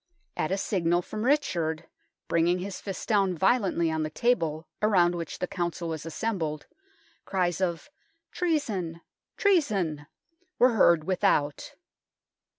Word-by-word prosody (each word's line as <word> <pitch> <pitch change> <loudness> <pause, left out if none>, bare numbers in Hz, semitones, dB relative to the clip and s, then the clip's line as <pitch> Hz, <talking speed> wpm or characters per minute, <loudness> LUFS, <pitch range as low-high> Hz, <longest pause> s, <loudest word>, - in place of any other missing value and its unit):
At 155 - -1
a 195 - +1
signal 175 -3 +1
from 215 +4 -5
Richard, 180 - 0 0.4
bringing 170 +2 +2
his 190 +1 -6
fist 195 -2 -6
down 195 -5 +2
violently 190 -4 +2
on 160 0 -1
the 155 - -1
table 165 -5 0
around 185 -5 +4
which 170 -2 -5
the - - -1
Council 175 -1 -3
was 160 0 -5
assembled, 165 -5 -3 0.6
cries 180 -2 -1
of 180 - -2 0.2
" 330 0 -48
Treason! 210 - -1 0.4
treason! 200 - +1 0.2
" 365 +3 -43
were 250 0 +5
heard 170 -7 +5
without. 180 - 0
180 Hz, 135 wpm, -27 LUFS, 165-220 Hz, 0.6 s, were